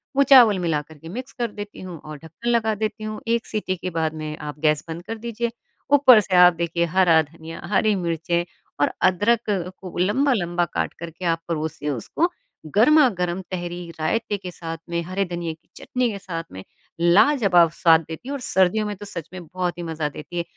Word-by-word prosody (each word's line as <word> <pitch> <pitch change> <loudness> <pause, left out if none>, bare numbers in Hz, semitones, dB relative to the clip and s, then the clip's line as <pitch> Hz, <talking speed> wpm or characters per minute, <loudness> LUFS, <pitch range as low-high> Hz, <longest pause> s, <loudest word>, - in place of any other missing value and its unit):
वो 280 - +5
चावल 240 -8 +7
मिलाकर 155 -2 -2
के 165 +3 -11
मिक्स 255 +7 -7
कर 235 -2 -1
देती 205 0 -8
हूँ 180 -4 -8
और 155 -1 -7
ढक्कन 165 +10 -6
लगा 220 -2 +2
देती 215 +1 -3
हूँ, 215 0 -5
1 230 0 +1
सिटी 210 -3 -2
के 185 - -4
बाद 160 -2 -1
में 155 -1 -5
आप 150 -1 -7
गैस 150 -2 +2
बंद 165 +1 -6
कर 225 - -4
दीजिए। 235 +1 -3 0.4
ऊपर 265 -5 +8
से 190 -2 -2
आप 180 0 +8
देखिए 170 0 -1
हरा 170 -2 +4
धनिया, 160 +2 -10
हरी 215 -2 +3
मिर्चें 170 -1 -1 0.4
और - - +3
अदरक 210 +5 +2
को 185 -1 -4
लंबा-लंबा 185 -4 +1
काटकर 170 0 -4
के 180 +3 -8
आप 165 -1 +1
परोसिए 160 -2 -3
उसको, 145 - -1 0.5
गरमा-गरम 210 - +4
तहरी 175 -1 -5
रायते 205 +5 -1
के 185 -2 -8
साथ 165 -1 -6
में, 170 0 -1
हरे 185 +3 -1
धनिए 170 -2 -4
की 160 - -25
चटनी 250 -2 -1
के 200 - -5
साथ 165 -4 -5
में 95 0 -9 0.4
लाजवाब 180 - +5
स्वाद 165 -1 +5
देती 160 +10 -8
है 285 - -2
और 280 - -3
सर्दियों 190 0 +2
में 205 -1 -3
तो 205 - -9
सच 170 -6 -7
में 180 -2 -8
बहुत 180 +1 -3
ही 175 - -5
मज़ा 160 -2 -3
देती 175 +4 -9
है। 170 - 0
180 Hz, 200 wpm, -23 LUFS, 165-215 Hz, 0.5 s, ऊपर